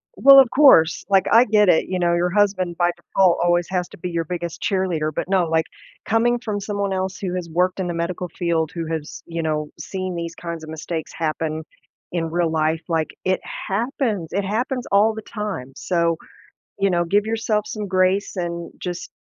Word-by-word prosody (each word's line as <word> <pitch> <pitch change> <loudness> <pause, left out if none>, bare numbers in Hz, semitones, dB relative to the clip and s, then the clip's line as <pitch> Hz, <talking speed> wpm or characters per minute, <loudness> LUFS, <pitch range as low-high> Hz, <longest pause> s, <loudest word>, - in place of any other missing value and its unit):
Well, 275 0 +9
of 260 -3 +6
course, 215 - +5
like 195 -2 +4
I 235 +2 +7
get 210 -2 +4
it, 160 - +4
you 185 -1 -2
know, 170 -1 +2
your 175 +1 +1
husband 195 -4 +1
by 175 -1 +2
default 180 +1 +2
always 175 0 +2
has 180 -2 -1
to - - -13
be 180 - -5
your 170 -1 -2
biggest 170 0 -5
cheerleader, 185 -7 0
but - - -3
no, 190 -3 +3
like, 160 0 +1 0.4
coming 240 +2 +2
from 210 -3 -3
someone 200 -1 -2
else 190 0 -2
who 185 -2 -3
has 175 -2 -4
worked 180 +3 +1
in 185 - -1
the 175 - -2
medical 170 +2 -3
field, 165 -2 -1
who 165 -2 -4
has, 160 -2 -5
you 165 -1 -3
know, 150 -1 -1
seen 185 -2 -4
these 170 0 -4
kinds 170 -1 -6
of 155 - -9
mistakes 160 0 -5
happen 160 -1 -2 0.5
in 165 -2 -2
real 175 -1 +1
life, 160 +1 0
like 160 -2 0 0.2
it 185 0 +1 0.3
happens, 215 - -1
it 200 - -1
happens 245 +5 -2
all 210 +3 +4
the 220 - -6
time, 205 - -5
so, 170 +1 0 0.6
you 195 - +3
know, 175 -1 +1
give 205 +4 +2
yourself 220 -1 0
some 210 -2 -5
grace 185 +2 +1
and 170 -2 -4
just 175 -1 -5
180 Hz, 200 wpm, -22 LUFS, 165-200 Hz, 0.6 s, Well